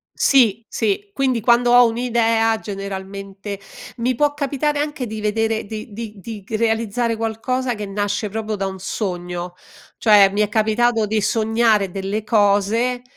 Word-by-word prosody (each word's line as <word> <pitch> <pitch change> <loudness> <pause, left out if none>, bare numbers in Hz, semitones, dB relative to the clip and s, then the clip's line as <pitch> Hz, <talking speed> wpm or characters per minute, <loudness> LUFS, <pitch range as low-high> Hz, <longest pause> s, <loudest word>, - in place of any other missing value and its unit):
Sì, 230 -5 +3
sì, 405 0 -1
quindi 260 -4 +1
quando 240 +2 +3
ho 245 0 +7
un'idea, 225 -1 +1
generalmente 195 0 -6 0.4
mi 245 +2 0
può 290 +3 +1
capitare 290 +1 -1
anche 295 -4 -3
di 220 0 -6
vedere 220 +1 0
di 215 +1 -8
di 220 0 -7
di 215 0 -8
c 220 +1 -3
realizzare 230 +1 0
qualcosa 240 +3 -2
che 210 -1 -5
nasce 205 +1 -2
proprio 215 0 -3
da 195 - -2
un 190 0 -5
sogno, 180 -3 -4 0.4
cioè 205 -3 +6
mi 205 +2 -2
è 210 - +1
capitato 220 +1 +2
di 215 +1 0
sognare 220 -2 +2
delle 195 +3 -3
cose 215 +4 +2
220 Hz, 150 wpm, -20 LUFS, 205-240 Hz, 0.4 s, ho